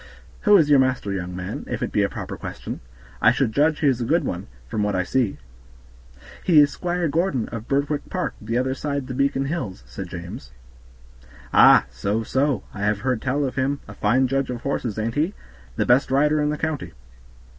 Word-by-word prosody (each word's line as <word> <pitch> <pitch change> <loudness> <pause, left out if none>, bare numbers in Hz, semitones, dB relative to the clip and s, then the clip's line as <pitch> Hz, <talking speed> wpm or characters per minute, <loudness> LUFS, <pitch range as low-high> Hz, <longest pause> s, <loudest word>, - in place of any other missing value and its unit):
"Who 210 -1 +8
is 160 -5 +4
your 145 -2 +6
master, 130 -6 +1
young 90 -2 -4
man? 90 0 -5
if - - -2
it - - -2
be - - +2
a - - +1
proper - - -6
question. - - -7 0.4
I - - +6
should - - +1
judge 150 +5 +2
he 150 - +3
is 130 -3 +2
a - - +1
good - - +2
one, - - -4 0.2
from 105 - -2
what 105 -1 0
I 90 - +1
see." 120 +1 0 1.1
"He 165 -4 +6
is 145 0 +5
Squire 175 -1 -1
Gordon, 155 -5 0
of 115 -1 -7
Birtwick 140 +1 -1
Park, 185 - -2
the 115 +3 -2
other 130 +1 0
side 140 0 -3
the 130 - -6
Beacon 140 +1 +1
Hills," 135 - -4
said 90 +10 -7
James. 85 -8 -8 1.0
"Ah! - - +7
so, 100 - -1
so, 135 +3 0
I 105 - -8
have 105 0 0
heard 125 -2 0
tell 140 +2 0
of 130 - -4
him; 135 +2 0 0.2
fine 130 +5 +3
judge 135 0 0
of 120 -2 -4
horses, 125 -6 -2
ain't 110 +1 -1
he? 160 +9 0 0.4
the - - 0
best 125 +3 +4
rider 150 +3 +3
in 150 - +1
the 150 - -1
county." 150 - -3
130 Hz, 205 wpm, -23 LUFS, 105-145 Hz, 1.1 s, Who